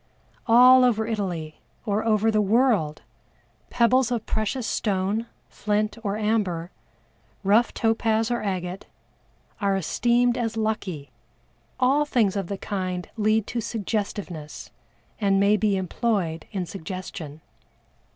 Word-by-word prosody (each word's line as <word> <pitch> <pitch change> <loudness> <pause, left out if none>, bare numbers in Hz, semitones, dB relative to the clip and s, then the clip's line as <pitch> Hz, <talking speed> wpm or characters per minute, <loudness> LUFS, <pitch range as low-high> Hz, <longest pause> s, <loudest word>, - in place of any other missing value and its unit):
All 250 +2 +7
over 220 -3 +2
Italy, 180 -8 -4 0.2
or 210 0 0
over 220 0 +2
the 215 -1 +2
world, 210 - +2 0.7
pebbles 245 +1 +3
of 235 -3 -2
precious 220 +3 -2
stone, 205 +1 -1 0.2
flint 210 0 -1
or 200 -1 -1
amber, 205 -6 -1 0.7
rough 210 +5 +3
topaz 225 0 +1
or 240 - 0
agate, 185 -2 -4 0.7
are 200 -2 +1
esteemed 240 +6 +1
as 225 -1 -2
lucky; 200 -9 -3 0.7
all 270 +4 +3
things 220 -8 +1
of 195 -3 -2
the 200 - -4
kind 185 -3 -4
lead 215 -1 +2
to 235 - -3
suggestiveness, 200 -8 -4 0.5
and 195 -2 +2
may 200 +1 +4
be 205 -1 +1
employed 185 -4 -2
in 190 -3 -3
suggestion. 170 -4 -7
210 Hz, 120 wpm, -24 LUFS, 190-225 Hz, 0.7 s, All